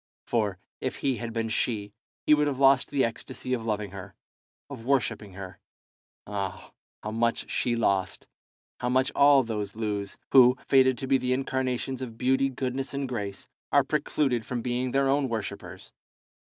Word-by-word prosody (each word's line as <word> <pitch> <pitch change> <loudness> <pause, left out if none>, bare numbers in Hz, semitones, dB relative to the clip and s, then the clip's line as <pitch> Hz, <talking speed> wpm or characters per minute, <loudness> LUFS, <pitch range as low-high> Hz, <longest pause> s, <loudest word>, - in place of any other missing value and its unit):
For, 105 -5 0 0.2
if - - -3
he 135 -3 -1
had 120 -1 -5
been 115 0 -1
she, 105 -3 -1 0.3
he 150 - +6
would 150 0 +3
have 140 -3 -1
lost 135 -1 +5
the 140 -2 +2
ecstasy 125 +2 -5
of 120 -3 -1
loving 105 -3 -2
her, 95 -2 -9 0.5
of 135 -5 -9
worshipping 115 -6 0
her. 95 -1 -9 0.7
Ah, 100 -3 -5 0.3
how 105 - -3
much 115 +1 0
she 120 - +1
lost, 100 -5 0 0.5
how 125 - -1
much 130 +2 +2
all 140 -1 +6
those 105 -3 -4
lose, 105 -3 -3
who, 125 -1 +7
fated 130 -2 +5
to 135 - -4
be 135 0 +3
the 125 0 0
incarnations 130 -1 -2
of 115 -3 -6
beauty, 130 +2 +2
goodness, 130 +1 -3
and 140 -1 -2
grace, 100 -6 -5 0.2
are - - +5
precluded 125 -6 0
from 120 0 -4
being 125 +1 -1
their 135 +2 +2
own 135 0 +2
worshippers! 110 -3 -6
125 Hz, 165 wpm, -27 LUFS, 110-135 Hz, 0.7 s, who